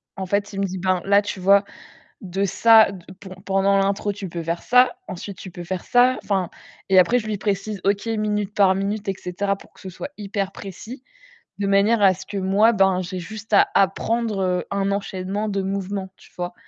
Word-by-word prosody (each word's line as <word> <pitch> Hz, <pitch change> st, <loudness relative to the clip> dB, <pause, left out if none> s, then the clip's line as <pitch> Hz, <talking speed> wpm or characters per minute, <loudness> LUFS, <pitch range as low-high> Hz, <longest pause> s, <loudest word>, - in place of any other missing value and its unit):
En 190 Hz, -, -4 dB
fait, 200 Hz, +2 st, -1 dB
il 195 Hz, -, -4 dB
me -, -, +1 dB
dit: 190 Hz, 0 st, -5 dB
«Ben, 185 Hz, -1 st, +1 dB
là, 200 Hz, +1 st, +4 dB
tu 205 Hz, -2 st, -6 dB
vois, 200 Hz, +2 st, +5 dB, 0.6 s
de 195 Hz, +1 st, -2 dB
ça 220 Hz, +1 st, +5 dB
d 180 Hz, -3 st, -11 dB
p 190 Hz, -1 st, -12 dB, 0.2 s
pendant 195 Hz, 0 st, +2 dB
l'intro, 200 Hz, +1 st, 0 dB
tu 195 Hz, -2 st, -7 dB
peux 170 Hz, 0 st, -5 dB
faire 170 Hz, +1 st, -3 dB
ça, 250 Hz, +5 st, +4 dB
ensuite, 185 Hz, +1 st, -7 dB
tu 185 Hz, -, -9 dB
peux 175 Hz, 0 st, -9 dB
faire 185 Hz, 0 st, -4 dB
ça», 250 Hz, +1 st, +3 dB
enfin 190 Hz, -4 st, -1 dB, 0.4 s
et 190 Hz, -, +6 dB
après 235 Hz, +8 st, +5 dB
je 215 Hz, -, -6 dB
lui 210 Hz, -2 st, -3 dB
précise 205 Hz, 0 st, -2 dB
OK, 200 Hz, +2 st, 0 dB
minute 210 Hz, -2 st, -1 dB
par 190 Hz, -2 st, +4 dB
minute 200 Hz, +2 st, -3 dB
et 195 Hz, -, 0 dB
cetera 195 Hz, +2 st, -2 dB
pour -, -, -18 dB
que -, -, -20 dB
ce 190 Hz, -, -8 dB
soit 275 Hz, +10 st, -7 dB
hyper 200 Hz, -1 st, -3 dB
précis, 215 Hz, +8 st, -9 dB, 0.6 s
de 200 Hz, -, -1 dB
manière 205 Hz, +3 st, +3 dB
à 190 Hz, -2 st, +5 dB
ce 190 Hz, -, -11 dB
que 205 Hz, -1 st, -6 dB
moi, 195 Hz, +4 st, +3 dB
ben 190 Hz, -2 st, +3 dB
j'ai 185 Hz, +1 st, -5 dB
juste 215 Hz, +4 st, -8 dB
à 200 Hz, -, +5 dB
apprendre, 215 Hz, +2 st, +1 dB
heu, 180 Hz, -2 st, 0 dB
un 200 Hz, 0 st, 0 dB
enchaînement 200 Hz, +1 st, -3 dB
de 200 Hz, -2 st, -1 dB
mouvements, 195 Hz, 0 st, -4 dB
tu -, -, -20 dB
vois? 175 Hz, 0 st, -4 dB
195 Hz, 215 wpm, -22 LUFS, 190-205 Hz, 0.6 s, et